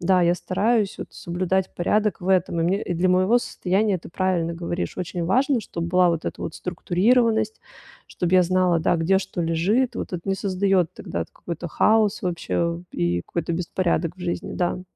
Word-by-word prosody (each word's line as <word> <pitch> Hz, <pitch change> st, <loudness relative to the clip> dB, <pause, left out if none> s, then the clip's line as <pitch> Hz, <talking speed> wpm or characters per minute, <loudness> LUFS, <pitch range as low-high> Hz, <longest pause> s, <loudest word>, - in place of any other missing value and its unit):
Да, 185 Hz, +1 st, +3 dB
я 175 Hz, 0 st, +3 dB
стараюсь 205 Hz, +3 st, 0 dB
вот -, -, -6 dB
соблюдать 185 Hz, +2 st, -2 dB
порядок 210 Hz, +4 st, +1 dB
в 185 Hz, -, -5 dB
этом, 180 Hz, -3 st, +2 dB
и -, -, +2 dB
мне, 190 Hz, +5 st, +1 dB
и 175 Hz, -, -3 dB
для 180 Hz, +2 st, +1 dB
моего 185 Hz, +6 st, +4 dB
состояния, 195 Hz, -3 st, 0 dB
ты -, -, -12 dB
правильно 175 Hz, -2 st, 0 dB
говоришь, 170 Hz, +1 st, -4 dB
очень 180 Hz, -1 st, -3 dB
важно, 255 Hz, -, +2 dB
чтоб 170 Hz, -4 st, -5 dB
была 180 Hz, +1 st, +3 dB
вот 165 Hz, -1 st, -2 dB
эта -, -, -5 dB
вот 165 Hz, -, -5 dB
структурированность, 220 Hz, -, +1 dB, 0.5 s
чтобы 180 Hz, +1 st, -1 dB
я 185 Hz, -, +7 dB
знала, 180 Hz, -1 st, +2 dB
да, 160 Hz, -, +2 dB
где 175 Hz, +4 st, +2 dB
что 185 Hz, -, -5 dB
лежит. 200 Hz, +10 st, +1 dB
Вот -, -, -5 dB
это 175 Hz, -, -3 dB
не 195 Hz, -, +2 dB
создает 190 Hz, -3 st, +1 dB
тогда 85 Hz, -1 st, -4 dB
т -, -, -26 dB
какой-то 170 Hz, 0 st, -6 dB
хаос 215 Hz, +4 st, +2 dB
вообще 170 Hz, -1 st, -1 dB
и 85 Hz, 0 st, 0 dB
какой-то 170 Hz, -, -3 dB
беспорядок 170 Hz, -1 st, -1 dB
в -, -, -16 dB
жизни, 175 Hz, -1 st, -3 dB
да. 180 Hz, 0 st, -1 dB
180 Hz, 190 wpm, -23 LUFS, 170-195 Hz, 0.5 s, я